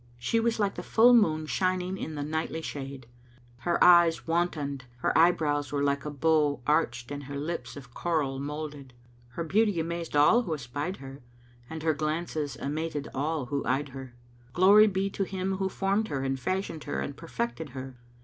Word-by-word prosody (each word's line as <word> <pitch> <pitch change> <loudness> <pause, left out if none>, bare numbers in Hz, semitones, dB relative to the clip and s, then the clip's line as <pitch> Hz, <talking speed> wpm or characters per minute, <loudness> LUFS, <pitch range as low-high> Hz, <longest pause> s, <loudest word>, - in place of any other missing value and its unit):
She 120 - 0
was 225 0 0
like 200 -2 +1
the - - -6
full 240 +2 +5
moon 160 -9 +4
shining 185 +2 0
in 160 -4 -5
the 145 - -3
nightly 160 +1 -3
shade; 135 -3 -6 0.5
her 170 +8 0
eyes 175 -2 +6
wantoned, 155 -6 -1 0.2
her - - +1
eyebrows 155 -4 +3
were 145 -1 0
like 140 0 0
a - - -2
bow 150 -1 +2
arched 120 -5 0
and 145 -1 -5
her 140 +1 -6
lips 145 -4 -4
of 125 -4 -12
coral 145 -6 -1
moulded. 145 -2 -6 0.4
Her 170 - -3
beauty 200 +2 +2
amazed 165 -1 -3
all 150 +12 +6
who 170 -9 -2
espied 145 +7 -4
her 135 +1 -10 0.5
and 160 -1 -6
her 160 -1 +3
glances 155 -2 -2
amated 150 0 -3
all 150 +1 -1
who 140 - 0
eyed 135 +2 0
her. 130 -2 -9 0.4
Glory 200 +4 +7
be 195 -1 0
to 195 - -1
Him 190 0 -2
who 190 0 -1
formed 200 +3 0
her 135 -8 -3
and 135 0 -1
fashioned 185 -1 -3
her 70 - -2
and 70 - -4
perfected 120 0 -4
her! 130 -2 -8
155 Hz, 180 wpm, -28 LUFS, 140-175 Hz, 0.5 s, Glory